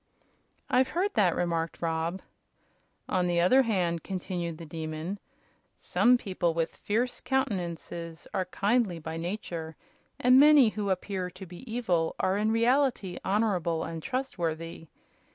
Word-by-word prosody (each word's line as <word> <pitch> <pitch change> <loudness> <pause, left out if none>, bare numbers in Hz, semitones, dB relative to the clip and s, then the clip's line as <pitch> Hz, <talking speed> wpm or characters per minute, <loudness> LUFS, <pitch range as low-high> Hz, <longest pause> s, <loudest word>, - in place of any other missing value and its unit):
"I've 260 +1 +3
heard 375 +8 -1
that," 185 -5 +3
remarked 165 -2 -1
Rob. 165 +2 -2 0.8
"On 180 -1 +1
the 175 -1 +1
other 220 +10 +6
hand," 180 -8 0
continued 175 -3 -4
the 165 - -9
Demon, 160 +4 -5 0.6
"some 250 +1 +3
people 185 -6 -1
with 165 -1 -1
fierce 240 +4 -1
countenances 175 -9 -3
are 185 - 0
kindly 200 0 +1
by 160 0 -6
nature, 170 -3 -5 0.4
and 255 +1 +6
many 290 -4 +7
who 210 -2 -3
appear 185 0 -2
to 190 +2 -10
be 185 +7 -11
evil 180 -9 0
are 190 - +2
in 215 +2 +1
reality 235 -5 +2
honorable 190 -5 +1
and 165 -1 -5
trustworthy. 165 -10 -3
185 Hz, 135 wpm, -29 LUFS, 165-225 Hz, 0.8 s, many